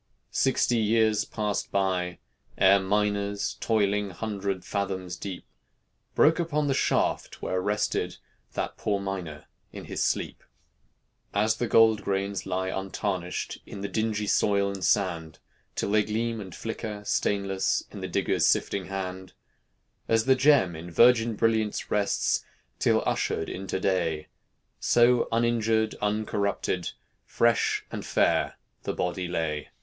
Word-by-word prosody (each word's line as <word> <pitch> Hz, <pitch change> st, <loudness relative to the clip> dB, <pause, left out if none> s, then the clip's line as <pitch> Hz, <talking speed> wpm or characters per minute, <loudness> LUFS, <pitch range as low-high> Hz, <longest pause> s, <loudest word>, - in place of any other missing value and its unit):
Sixty 125 Hz, -2 st, +2 dB
years 110 Hz, -1 st, +2 dB
passed 105 Hz, -2 st, -2 dB
by, 90 Hz, -2 st, 0 dB, 0.4 s
ere 95 Hz, +1 st, +6 dB
miners 100 Hz, +1 st, 0 dB
Toiling, 105 Hz, -2 st, +1 dB
hundred 100 Hz, -1 st, -4 dB
fathoms 95 Hz, -3 st, -3 dB
deep, 95 Hz, -1 st, -7 dB, 0.7 s
Broke 160 Hz, +3 st, +5 dB
upon 150 Hz, -3 st, 0 dB
the 140 Hz, -, +1 dB
shaft -, -, 0 dB
where 95 Hz, 0 st, -1 dB
rested 105 Hz, +2 st, -1 dB, 0.4 s
That -, -, -3 dB
poor 100 Hz, -2 st, 0 dB
miner 90 Hz, -6 st, -5 dB, 0.3 s
in -, -, -8 dB
his -, -, -4 dB
sleep. -, -, -1 dB, 0.9 s
As 110 Hz, +2 st, +2 dB
the 120 Hz, -, -1 dB
gold 110 Hz, -1 st, +5 dB
grains 100 Hz, 0 st, -2 dB
lie 95 Hz, +1 st, -1 dB
untarnished 95 Hz, -2 st, -3 dB
In 100 Hz, -, -8 dB
the 100 Hz, -, -2 dB
dingy 105 Hz, +1 st, -1 dB
soil 100 Hz, -1 st, +2 dB
and 95 Hz, -1 st, -6 dB
sand, 85 Hz, -6 st, 0 dB, 0.4 s
Till -, -, -1 dB
they 105 Hz, 0 st, +4 dB
gleam 115 Hz, +1 st, -2 dB
and 95 Hz, -3 st, -9 dB
flicker, 110 Hz, -2 st, -5 dB
stainless, 100 Hz, -2 st, 0 dB
In -, -, -8 dB
the -, -, -3 dB
digger's -, -, +1 dB
sifting 100 Hz, -2 st, +1 dB
hand; 95 Hz, -1 st, -5 dB, 0.7 s
As 115 Hz, 0 st, +2 dB
the 135 Hz, -, +6 dB
gem 130 Hz, -, +4 dB
in 80 Hz, +2 st, -8 dB
virgin 115 Hz, +5 st, +5 dB
brilliance 110 Hz, -1 st, 0 dB
Rests, 105 Hz, -1 st, +1 dB, 0.4 s
till -, -, +3 dB
ushered 80 Hz, -, -1 dB
into 95 Hz, 0 st, -4 dB
day; 85 Hz, -5 st, 0 dB, 0.5 s
So 120 Hz, 0 st, +4 dB
uninjured, 115 Hz, -1 st, +2 dB
uncorrupted, 105 Hz, -3 st, -1 dB, 0.3 s
Fresh 120 Hz, 0 st, +1 dB
and -, -, -5 dB
fair -, -, +1 dB, 0.3 s
the -, -, -3 dB
body 90 Hz, 0 st, -2 dB
lay. 80 Hz, -3 st, -2 dB
100 Hz, 130 wpm, -27 LUFS, 95-110 Hz, 0.9 s, ere